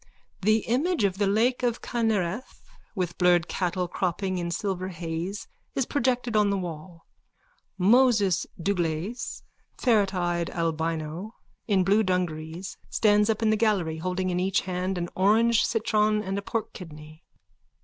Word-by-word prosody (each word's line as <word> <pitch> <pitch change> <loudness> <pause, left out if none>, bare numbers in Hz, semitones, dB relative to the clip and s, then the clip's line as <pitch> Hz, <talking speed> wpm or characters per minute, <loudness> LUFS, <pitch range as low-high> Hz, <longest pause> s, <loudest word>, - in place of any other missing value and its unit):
_(The 215 +2 +3
image 285 - +1
of 195 -1 0
the 205 - +2
lake 230 +6 +2
of 240 -2 -1
Kinnereth 220 -2 -2 0.3
with 180 -3 -3
blurred 175 -2 +4
cattle 180 -1 -1
cropping 185 +1 -2
in 170 0 -3
silver 185 +1 -2
haze 170 +2 -5 0.3
is 265 - +1
projected 250 -4 0
on 210 -1 +4
the 200 - +1
wall. 170 -1 -7 0.7
Moses 210 -2 +4
Dlugacz, 175 +4 -2 0.3
ferreteyed 185 -7 +1
albino, 165 +4 -3 0.3
in 195 -4 +3
blue 200 +4 +4
dungarees, 180 -2 -2
stands 210 -1 +3
up 220 +1 0
in 215 - +3
the - - +3
gallery, 200 -8 +1
holding 185 +2 -2
in 180 - 0
each 190 +1 +1
hand 185 0 -2
an 175 0 -2
orange 220 +4 +4
citron 215 -1 +1
and 195 -1 -3
a 200 - -2
pork 220 +2 -3
kidney.) 155 -2 -11
190 Hz, 140 wpm, -26 LUFS, 175-215 Hz, 0.7 s, blurred